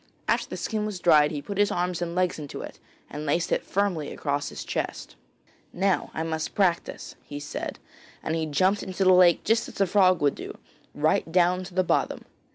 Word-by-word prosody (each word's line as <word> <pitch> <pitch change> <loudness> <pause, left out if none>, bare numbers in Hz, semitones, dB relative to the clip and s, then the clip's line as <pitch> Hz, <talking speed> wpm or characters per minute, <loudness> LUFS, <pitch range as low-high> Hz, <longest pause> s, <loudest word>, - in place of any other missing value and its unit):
After - - +1
the - - -5
skin 215 -1 -2
was 205 -4 -5
dried 150 -4 +5
he 145 -2 -5
put 200 -1 -5
his 205 - +4
arms 175 0 -1
and 170 0 -3
legs 180 -2 0
into 145 -2 -7
it, - - -10 0.3
and 150 - -7
laced 160 +3 0
it - - +2
firmly 185 -7 -1
across 145 0 -2
his - - -7
chest. - - -4 0.6
'Now 190 0 0
I 160 - -1
must 160 -1 -3
practise,' 185 -4 0
he 145 - -7
said, 145 - -5 0.5
and 160 - -2
he 160 -1 -1
jumped 185 +7 +2
into 190 +1 -2
the 185 0 +6
lake 180 -2 +5
just 225 +1 +2
as - - -11
a 195 - +4
frog 185 -2 +4
would 145 -1 +2
do, - - -8 0.4
right 155 +2 +1
down 180 +1 +3
to 180 0 -11
the 185 - +3
bottom. - - 0
175 Hz, 205 wpm, -26 LUFS, 155-190 Hz, 0.6 s, the